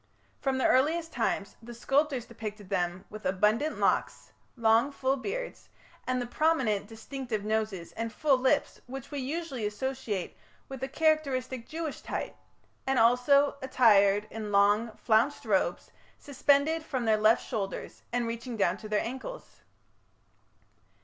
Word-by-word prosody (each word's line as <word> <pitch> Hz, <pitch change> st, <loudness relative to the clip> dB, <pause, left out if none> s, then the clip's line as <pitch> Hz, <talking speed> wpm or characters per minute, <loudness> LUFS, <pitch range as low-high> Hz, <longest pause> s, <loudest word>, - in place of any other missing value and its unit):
From 270 Hz, -1 st, 0 dB
the 260 Hz, -, +1 dB
earliest 320 Hz, +5 st, +2 dB
times 205 Hz, -4 st, -1 dB
the 240 Hz, +1 st, -10 dB
sculptors 270 Hz, 0 st, +1 dB
depicted 210 Hz, -3 st, -8 dB
them 180 Hz, -2 st, -1 dB
with 215 Hz, 0 st, -9 dB
abundant 210 Hz, +11 st, +1 dB
locks, -, -, 0 dB, 0.3 s
long 230 Hz, +4 st, +3 dB
full 270 Hz, -1 st, 0 dB
beards, -, -, -5 dB, 0.4 s
and 255 Hz, 0 st, 0 dB
the 245 Hz, -, -2 dB
prominent 245 Hz, -7 st, +1 dB
distinctive 225 Hz, -1 st, -5 dB
noses 215 Hz, -5 st, -2 dB
and 230 Hz, 0 st, -4 dB
full 275 Hz, -1 st, +2 dB
lips, 265 Hz, +3 st, +1 dB
which 270 Hz, +2 st, -8 dB
we 290 Hz, -, -3 dB
usually 275 Hz, -2 st, -4 dB
associate 210 Hz, -2 st, -3 dB, 0.3 s
with 270 Hz, -1 st, -7 dB
the 265 Hz, -, -3 dB
characteristic 270 Hz, -5 st, 0 dB
Jewish 320 Hz, -1 st, -5 dB
type, -, -, -4 dB, 0.5 s
and 265 Hz, -1 st, +2 dB
also 250 Hz, +5 st, +4 dB
attired 210 Hz, -6 st, +4 dB
in 215 Hz, -2 st, -5 dB
long, 205 Hz, +3 st, +4 dB
flounced 230 Hz, +6 st, +2 dB
robes, 190 Hz, -4 st, 0 dB, 0.3 s
suspended 285 Hz, +3 st, +2 dB
from 260 Hz, -6 st, -3 dB
their 220 Hz, -1 st, +4 dB
left 215 Hz, +2 st, +3 dB
shoulders, 200 Hz, -5 st, -4 dB
and 240 Hz, 0 st, 0 dB
reaching 230 Hz, +1 st, -5 dB
down 185 Hz, -2 st, +2 dB
to 215 Hz, -, -9 dB
their 210 Hz, -1 st, +1 dB
ankles. 265 Hz, -, -8 dB
245 Hz, 140 wpm, -29 LUFS, 215-275 Hz, 0.5 s, also